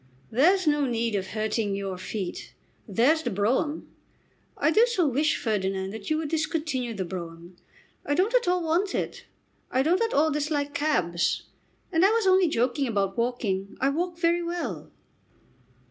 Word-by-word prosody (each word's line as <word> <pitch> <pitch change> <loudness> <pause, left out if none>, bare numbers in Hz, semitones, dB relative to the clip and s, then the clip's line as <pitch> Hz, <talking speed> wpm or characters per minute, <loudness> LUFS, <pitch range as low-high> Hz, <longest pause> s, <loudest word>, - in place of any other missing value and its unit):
"There's 360 - +4
no 295 -2 +2
need 235 -2 -1
of 190 -2 -1
hurting 215 0 -1
your 195 -1 -3
feet. 185 +1 -6 0.3
There's 250 - +3
the 245 - -2
brougham." 240 - 0 0.7
"I - - +2
do 450 +7 +5
so 380 -9 +1
wish, 295 +4 +1
Ferdinand, 195 -1 -2
you 310 - +2
would 315 -2 -3
discontinue 300 -6 -2
the 190 -2 -3
brougham. 170 0 -8 0.5
I 290 - 0
don't 390 +8 +1
at - - +3
all 360 -1 +2
want 345 +5 0
it. - - -4 0.4
I 260 - +1
don't 350 +7 +2
at 455 0 +1
all 310 +2 +3
dislike 290 -1 -1
cabs. 180 - 0 0.5
And 330 0 +3
I 390 - +7
was 450 -1 +1
only 375 -1 +5
joking 260 0 0
about 200 -4 0
walking. 210 -5 -2
I 270 - +2
walk 345 +4 -2
very 340 0 +2
well." 345 0 -4
280 Hz, 160 wpm, -26 LUFS, 205-330 Hz, 0.7 s, I